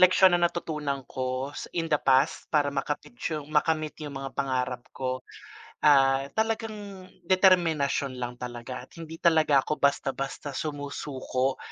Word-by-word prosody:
leksiyon 185 0 +7
na 175 - +2
natutunan 150 -5 -3
ko 130 +1 -3 0.3
in 165 -1 0
the - - +6
past 135 0 +3
para 145 -2 +3
ma-kamit 140 0 -3 0.2
yung 150 -2 -4
ma-kamit 155 0 +1
yung 145 -2 -6
mga 135 0 -5
pangarap 130 -2 -1 0.2
ko 130 -1 -2 0.6
ah, 135 -2 +6 0.2
talagang 215 -4 -2 0.2
determinasyon 165 -8 +3
lang 120 0 -4
talaga 125 0 -6
at - - -44
hindi 165 0 -8
talaga 155 -5 +4
ako - - +1
basta-basta 140 0 0
sumusuko 140 -3 -2
145 Hz, 135 wpm, -27 LUFS, 135-165 Hz, 0.6 s, leksiyon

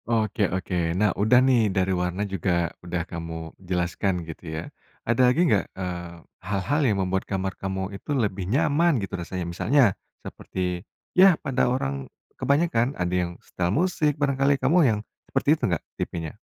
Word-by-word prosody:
Oke 110 -3 +1
oke, 90 -2 -1
nah, 105 0 +3
udah 110 +4 +4
nih 120 -5 +4
dari 95 0 +1
warna 90 +3 -1
juga 90 -3 -1
udah 85 -1 -3
kamu 80 -2 -6 0.2
jelaskan 90 0 -1
gitu 80 -1 -9
ya - - -2 0.4
ada 120 +2 +2
lagi 165 +8 +3
nggak? 105 - +3
Eee, 90 -2 -5 0.2
hal-hal 100 - -1
yang 105 - +1
membuat 95 +1 -2
kamar 95 -1 -1
kamu 95 0 -3
itu 100 - -11
lebih 100 -6 -1
nyaman 150 +4 +3
gitu 100 -3 -4
rasanya 90 +1 -4
misalnya 120 +2 +3 0.3
seperti 90 -1 -4 0.3
ya 185 -2 +7
pada 130 -2 +1
orang, 70 - -2 0.2
kebanyakan 140 -4 +1
ada 90 0 -1
yang 90 -1 0
setel 85 -1 -2
musik 155 - +1
barangkali 140 -1 +2
kamu 135 +7 +2
yang 105 -2 0 0.3
seperti - - +3
itu - - 0
nggak - - -1 0.2
tipenya? 80 -3 -4
95 Hz, 160 wpm, -25 LUFS, 90-130 Hz, 0.4 s, ya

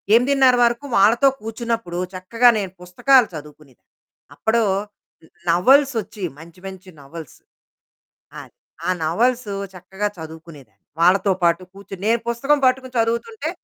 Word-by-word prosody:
8:30 260 +1 +4
వరకు 235 +4 0
వాళ్ళతో 225 +7 +4
కూర్చున్నప్పుడు 225 -4 -4 0.2
చక్కగా 230 +7 +2
నేను 195 -3 -5
పుస్తకాలు 230 +8 +3
చదువుకునేదాన్ని. 150 -3 -13 0.4
అప్పుడు 230 +1 +1 0.9
నోవెల్స్ 265 +11 +4
వచ్చేవి 205 -3 -7
మంచి, 165 +2 -15
మంచి 190 -1 -11
నోవెల్స్. 155 +1 -11 1.0
అది. - - -16 0.3
ఆ - - 0
నోవెల్స్ 230 +8 0 0.3
చక్కగా 190 +3 -4
చదువుకునేదాన్ని. 160 - -12 0.2
వాళ్ళతో 190 +3 +4
పాటు 170 +1 +2
కూర్చొని. 195 -1 -11
నేను 230 +1 +2
పుస్తకం 275 +5 +1
పట్టుకుని 255 0 0
చదువుతుంటే 235 - -2
205 Hz, 115 wpm, -20 LUFS, 170-240 Hz, 1.0 s, 8:30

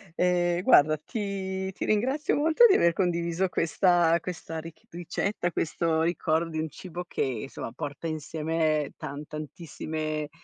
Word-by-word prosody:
Eh 175 -1 +2
guarda, 155 +2 +6
ti 190 +1 -4
ti - - -5
ringrazio 260 +8 +1
molto 320 +10 +5
di 390 - +6
aver 170 0 +4
condiviso 175 0 0
questa 170 -1 +3
questa 165 -2 -5
rich 165 0 -11
ricetta, 175 +1 -2
questo 160 0 0
ricordo 165 -1 +1
di 155 - -3
un 160 0 -2
cibo 180 +3 -7
che - - -4
insomma, 130 -2 -3
porta 145 +3 -5
insieme 155 -1 -1
tan 145 +2 -6
tantissime 155 0 -5
165 Hz, 140 wpm, -27 LUFS, 155-180 Hz, -, guarda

